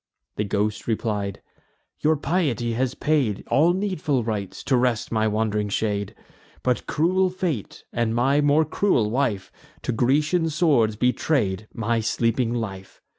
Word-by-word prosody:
The 105 - -1
ghost 105 +1 -1
replied: 105 -3 -2 0.6
"Your 155 +1 +3
piety 140 -8 0
has 130 +2 -1
paid 140 -10 0
All 160 +5 +5
needful 175 - -1
rites, 105 -4 -4
to 135 - +2
rest 125 -3 +1
my 110 -1 +2
wand'ring 105 -1 0
shade; 100 -1 -2 0.5
But 125 -1 0
cruel 185 +4 +2
fate, 175 - -4
and 115 -1 0
my 135 +5 +3
more 145 +2 +4
cruel 150 - +1
wife, 110 -7 -1 0.3
To - - -1
Grecian 150 +8 +2
swords 145 -9 +2
betray'd 110 -4 0
my 115 0 -1
sleeping 115 +2 0
life. 100 -5 -5
120 Hz, 135 wpm, -24 LUFS, 110-150 Hz, 0.6 s, All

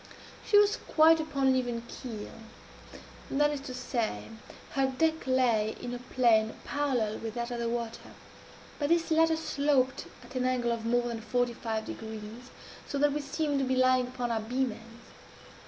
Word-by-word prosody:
She 410 - +4
was 415 0 +5
quite 320 +1 +5
upon 295 -4 -1
an 260 - +4
even 240 -2 -1
keel 225 -6 -7 1.0
that 295 +2 +2
is 290 -2 -4
to 270 -2 -7
say, 230 - -2 0.4
her 270 -1 +2
deck 320 +3 0
lay 235 -5 +2
in 245 - -5
a 245 - -4
plane 235 -3 +2
parallel 255 -7 -1
with 225 0 -6
that 240 0 -3
of 240 - -3
the 235 0 -1
water 235 -1 -4 0.7
but 290 -1 0
this 335 0 +2
latter 320 0 +4
sloped 280 -4 +1 0.2
at 240 - -13
an 255 -1 -1
angle 250 -2 +1
of 230 -1 -3
more 240 +1 +2
than 230 -2 -4
forty 245 +1 0
five 220 -2 -3
degrees, 220 +3 -8 0.4
so 285 - -3
that 290 0 +3
we 295 - -1
seemed 290 0 -1
to - - +1
be 260 0 +1
lying 255 -1 +3
upon 245 -1 -3
our 225 -1 0
beam 250 +3 -1
ends. 230 +2 -13
250 Hz, 180 wpm, -30 LUFS, 230-280 Hz, 1.0 s, was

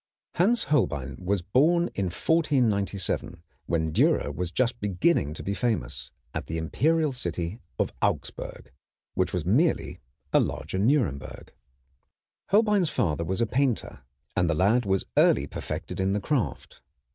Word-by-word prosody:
Hans 225 +7 +3
Holbein 70 - 0
was 95 0 -1
born 160 - +3
in 100 - -1
1497, 100 - 0 0.2
when 80 -2 0
Dürer 75 - +2
was 90 +3 -2
just 120 +4 0
beginning 95 - +1
to - - -7
be 100 - -2
famous, 110 +3 -2 0.2
at - - -4
the 80 - -3
imperial 150 - +1
city 90 -3 -3 0.2
of - - -1
Augsburg, - - -3 0.4
which 95 - 0
was 90 -4 -2
merely 140 - +1 0.3
a - - +6
larger 95 - -2
Nuremberg. 105 - 0 1.0
Holbein's 205 -4 +3
father 85 - 0
was 95 +6 -1
a - - +4
painter, 125 - -1 0.3
and 90 -1 +2
the 85 - +1
lad 105 +7 +2
was 95 -1 +1
early - - +5
perfected - - -5
in 95 +1 +1
the 105 - +1
craft. 105 - -2
100 Hz, 140 wpm, -27 LUFS, 85-140 Hz, 1.0 s, a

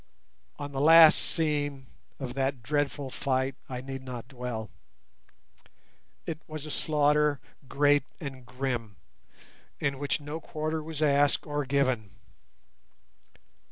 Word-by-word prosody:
On 145 0 -6
the 135 -1 -2
last 160 +1 +8
scene 145 -4 -1 0.3
of 130 -3 -5
that 135 -2 -1
dreadful 145 0 -1
fight 130 -1 0 0.2
I 125 -1 -4
need 135 0 -6
not 125 -2 -7
dwell. 125 -5 -5 1.5
It 160 0 -5
was 155 -1 -6
a 155 - -6
slaughter 150 -1 +2 0.3
great 145 0 +3
and 135 -5 -7
grim, 125 -4 -3 0.8
in 140 -2 -1
which 145 +1 -1
no 150 +2 -5
quarter 155 0 -3
was 155 0 -4
asked 145 -1 +3
or 145 -1 -2
given. 130 -7 0
140 Hz, 120 wpm, -29 LUFS, 130-150 Hz, 1.5 s, last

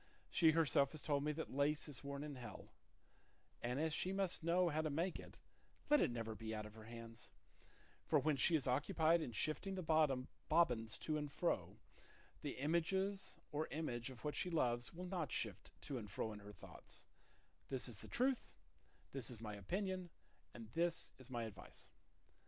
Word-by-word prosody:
She 165 - +6
herself 140 -3 +4
has 155 - -5
told 140 -2 +2
me 150 - +2
that 160 -2 -4
lace 145 +3 +2
is 145 -4 -5
worn 140 0 -3
in 150 -1 -4
hell; 125 -2 -8 0.9
and 125 +3 0
as 160 0 +2
she 185 - +1
must 195 -3 +1
know 175 +2 +4
how 155 0 +1
to 155 - 0
make 165 +5 0
it, - - -10 0.5
let 295 - +8
it - - +4
never 115 -2 -2
be 110 0 -4
out 105 0 -3
of 105 - -9
her 110 0 -11
hands; 115 0 -8 0.8
for - - +5
when 155 -1 +3
she 160 +5 +4
is 145 - +2
occupied 160 +5 +4
in 140 - -2
shifting 155 - -1
the 185 - -2 0.7
bobbins 120 -9 +4
to 155 -1 0
and 150 -1 -3
fro, - - 0 0.6
the - - -3
image 160 +5 +2 0.6
or 155 +2 0
images 125 -6 -2
of 130 +2 -10
what 150 - 0
she 180 - 0
loves 120 -7 +2
will 180 +2 -6
not 180 -4 -2
shift 100 -4 -2
to 135 -4 -2
and 105 -2 -7
fro 110 +2 -2
in 105 - -7
her 100 0 -9
thoughts; 95 -4 -10 0.6
this 130 -1 0
is 120 -5 -6
the - - -8
truth, 255 0 +2 0.6
this 135 -4 -2
is 120 -4 -7
my 110 -2 -4
opinion, 185 - -2 0.5
and 115 -2 -8
this 170 0 +1
is 130 0 -10
my 120 -2 -1
advice." 110 -3 -7
145 Hz, 185 wpm, -41 LUFS, 120-165 Hz, 0.9 s, let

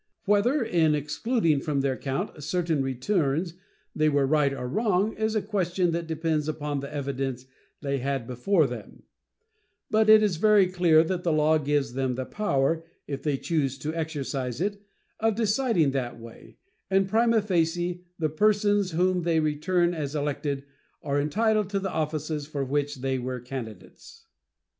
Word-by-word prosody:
Whether 225 +7 +3
in 160 -7 +2
excluding 155 - 0
from 140 -1 -1
their 135 -1 0
count 135 +2 -4
certain 165 -1 0
returns 145 +5 0 0.4
they 155 0 +3
were 140 -2 +2
right 145 0 +2
or 130 -2 -4
wrong 205 - +1
is 220 0 -1
a 215 - +1
question 185 -3 0
that 170 0 -3
depends 160 -1 -1
upon 150 -2 -2
the 140 +1 -7
evidence 135 -3 -3 0.4
they 140 -2 -1
had 135 -1 -2
before 150 +8 +2
them; 120 -4 -8 0.9
but 220 0 +3
it 215 0 +8
is 195 -6 +1
very 210 +1 +5
clear 175 -3 +4
that 180 +2 -2
the 170 - 0
law 155 +1 +3
gives 145 -3 0
them 130 -1 -1
the 130 +1 -3
power, 165 -5 0 0.2
if 140 -1 -5
they 145 -2 0
choose 140 -4 -1
to 150 +4 -4
exercise 140 -6 -3
it, 200 +2 -2 0.4
of 225 -1 +1
deciding 220 - +2
that 125 -3 -3
way, 115 0 -13 0.3
and, 195 0 +3
prima 230 +2 +3
facie, 175 -2 0
the 160 - 0
persons 205 +2 +2
whom 180 +2 +2
they 165 -1 +1
return 170 +4 +1
as 150 -3 -4
elected 145 -1 -2 0.4
are 145 -1 0
entitled 215 +6 +1
to 200 -1 -1
the 190 -1 -3
offices 155 -1 -2
for 145 -3 -3
which 145 0 -2
they 135 0 -1
were 125 0 -4
candidates. 120 -5 -9
155 Hz, 160 wpm, -26 LUFS, 140-185 Hz, 0.9 s, it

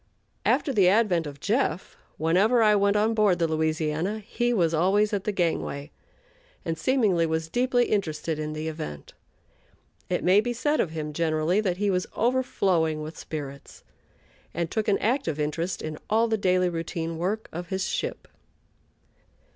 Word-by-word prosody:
After 280 - +2
the 195 -6 +4
advent 190 -6 +2
of 140 -1 -9
"Jeff," 200 - -1 0.2
whenever 195 +9 +3
I 210 -1 +5
went 200 0 +3
on 215 +2 +2
board 210 -5 +3
the 170 -1 +1
Louisiana, 160 +4 -1
he 240 +3 -1
was 170 -8 +2
always 200 +6 +2
at 200 -1 -1
the 210 - +1
gangway, 160 -5 -2 0.7
and 165 - -1
seemingly 190 - +2
was 160 0 -2
deeply 245 +3 +2
interested 160 -6 -1
in 155 0 -3
the 155 +1 -4
event. 75 - -6 1.0
It 180 - -1
may 190 +3 +5
be 240 +2 -2
said 295 +6 0
of 175 - +1
him, 155 -1 -5
generally, 160 +4 +1
that 185 -4 -1
he 205 0 +1
was 180 -1 0
overflowing 190 -10 +1
with 155 +2 -7
spirits, 140 -3 -8 0.7
and 170 0 -2
took 220 -1 -1
an 200 - +3
active 220 - -1
interest 165 +4 -2
in 155 -1 -5
all 225 +2 +3
the 225 - +1
daily 185 -3 +2
routine 165 -1 -4
work 205 +6 -2
of 175 +1 -6
his 190 +2 -2
ship. - - -3
180 Hz, 165 wpm, -26 LUFS, 160-210 Hz, 1.0 s, I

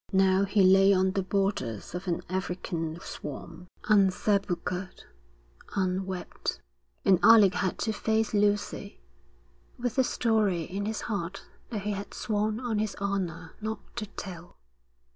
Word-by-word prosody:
Now 190 0 +4
he 200 0 +3
lay 195 +1 +7
on 190 0 +3
the 195 - 0
borders 185 - -1
of 180 +2 -5
an 175 0 -1
African 175 -3 -3
swamp, 165 +4 -8 0.2
unsepulchred, 195 -2 +1 0.7
unwept; 185 -1 -2 0.5
and 185 -3 +5
Alec 210 -5 +7
had 180 +1 -1
to 220 - 0
face 220 +1 0
Lucy, 205 - 0 0.8
with 245 0 -3
the 260 - +5
story 215 -9 +1
in 195 +5 -4
his 220 0 -2
heart 195 -3 -4 0.3
that 210 -5 -4
he 210 - -1
had 200 0 -5
sworn 215 0 -1
on 235 -4 -1
his 215 -1 -1
honour 180 -4 -3
not 215 0 -6
to 215 -3 -3
tell. 175 -4 -9
195 Hz, 135 wpm, -28 LUFS, 180-210 Hz, 0.8 s, lay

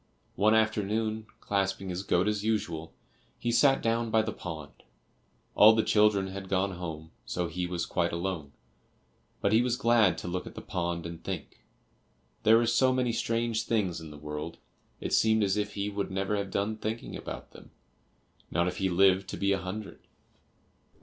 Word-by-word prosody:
One 110 +3 +4
afternoon, 110 0 0
clasping 95 -1 -1
his 90 +1 -3
goat 95 0 +1
as 105 -1 0
usual, 85 -7 -1 0.5
he 120 - -1
sat 135 +3 +4
down 115 0 +1
by 110 0 +3
the 110 -1 -3
pond. 80 -5 -7 0.8
All 110 +1 +8
the 110 - +3
children 105 -2 +3
had 95 0 -7
gone 95 +1 +1
home, 80 -3 -7
so 90 - -2
he 90 +2 -3
was 90 -1 -2
quite 85 -1 0
alone, 85 -4 -3 0.9
but 100 - +2
he 110 - +6
was 125 -1 +1
glad 115 -7 +4
to 80 - -6
look 90 +1 -3
at - - -10
the - - -6
pond 85 -1 -3
and 85 -1 -7
think. - - -6 0.8
There 110 +1 +6
were 120 - +3
so 120 +3 +3
many 125 -2 +1
strange 115 -1 -1
things 95 -7 0
in 80 - -9
the 75 - -10
world, 75 +2 -6 0.4
it - - -4
seemed 110 -1 +4
as 95 -1 +2
if 105 0 -2
he 100 0 -1
would 100 -1 -3
never 95 +2 -1
have 100 -1 -2
done 105 +3 -1
thinking 110 +2 -4
about - - -7
them, - - -14 0.8
not 85 +1 +1
if 90 - -3
he 95 -1 +1
lived 95 +1 +4
to - - -5
be 100 0 +1
a 100 - +2
hundred. 95 +1 -6
100 Hz, 185 wpm, -29 LUFS, 90-110 Hz, 0.9 s, All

